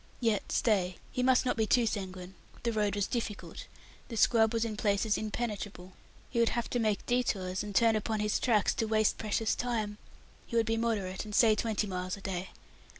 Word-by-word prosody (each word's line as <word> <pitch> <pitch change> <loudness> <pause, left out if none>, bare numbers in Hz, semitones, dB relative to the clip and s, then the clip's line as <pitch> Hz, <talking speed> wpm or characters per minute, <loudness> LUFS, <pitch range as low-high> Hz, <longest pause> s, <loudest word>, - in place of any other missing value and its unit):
Yet 225 -4 0
stay; 185 -5 +1
he 250 - -1
must 255 0 +4
not 250 - +1
be 220 -1 +1
too 240 +1 +4
sanguine; 190 -3 -4 0.3
the 235 -1 0
road 210 -2 +1
was 205 -1 +1
difficult; 225 -3 -5 0.4
the 230 - -6
scrub 220 -1 +4
was 230 -1 0
in 220 -2 -3
places 210 0 +1
impenetrable. 205 -4 -4 0.4
He 235 - 0
would 230 - +4
have 235 - -2
to 245 - 0
make 215 -3 0
détours, 195 -7 0
and 205 -2 -6
turn 225 0 +5
upon 215 0 -1
his 210 0 +1
tracks, 220 -5 +2
to 225 - -1
waste 215 -1 +2
precious 215 +1 0
time. 220 -4 -2 0.5
He 235 - -6
would 230 -1 +3
be 225 - +1
moderate, 210 -5 -1
and 210 -1 -6
say 225 -2 +6
twenty 215 0 0
miles 185 -1 -3
a - - -12
day. 190 -1 -4
215 Hz, 200 wpm, -31 LUFS, 200-230 Hz, 0.5 s, say